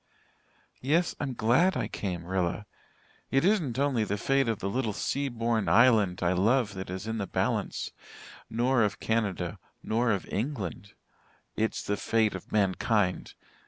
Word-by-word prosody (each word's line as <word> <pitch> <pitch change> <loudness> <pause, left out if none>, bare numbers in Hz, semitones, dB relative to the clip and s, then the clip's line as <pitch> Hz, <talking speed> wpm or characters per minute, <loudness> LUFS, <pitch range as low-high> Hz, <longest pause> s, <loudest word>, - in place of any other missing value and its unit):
Yes, 160 +6 +2
I'm 135 -3 -3
glad 130 +13 +3
I - - -1
came, 90 -4 -4
Rilla. 95 +2 -1 0.6
It 135 +5 +2
isn't 170 - +1
only 135 -5 +1
the 105 0 -2
fate 135 +4 +1
of 115 -2 0
the 95 - -4
little 115 0 -1
sea 140 +7 -1
born 115 -2 0
island 105 -6 +4
I 85 +1 +3
love 105 +4 +2
that 95 -1 -6
is 95 +2 -5
in 110 0 -3
the 100 - -2
balance - - -1 0.6
nor 120 +2 +2
of 105 -2 0
Canada 100 -6 -1 0.2
nor 115 +2 +1
of 100 -4 0
England. 105 - -3 0.6
It's 110 0 -1
the 105 - -1
fate 110 0 +1
of 95 - -8
mankind. 100 -1 +1
110 Hz, 155 wpm, -28 LUFS, 100-125 Hz, 0.6 s, island